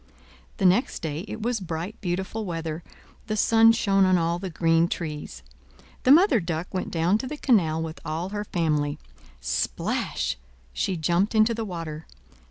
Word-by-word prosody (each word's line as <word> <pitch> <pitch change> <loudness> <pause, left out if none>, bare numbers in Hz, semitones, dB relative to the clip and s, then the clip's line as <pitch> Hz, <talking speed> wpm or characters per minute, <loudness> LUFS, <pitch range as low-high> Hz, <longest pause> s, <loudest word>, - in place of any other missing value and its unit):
The 195 - 0
next 190 +6 +2
day, 160 +3 -3
it 220 +1 -6
was 240 -1 0
bright, 175 +3 -5
beautiful 190 +4 -3
weather; 165 -3 -4 0.5
the 215 -1 -2
sun 225 +1 +6
shone 195 -4 +2
on 185 -1 +4
all 170 0 0
the 190 0 -5
green 165 0 +2
trees. 150 - -5 0.6
The 255 - +6
Mother 325 - +6
Duck 170 0 -4
went 185 - -2
down 175 +5 +1
to 260 - -4
the 300 +3 -5
canal 165 - +2
with 160 0 -6
all 165 +3 -3
her 205 +1 -3
family. 150 -6 0 0.4
Splash! - - -1 0.4
she 185 - -1
jumped 175 +7 +1
into 220 +2 +4
the 225 0 -3
water. 165 -4 -6
175 Hz, 165 wpm, -25 LUFS, 160-215 Hz, 0.6 s, sun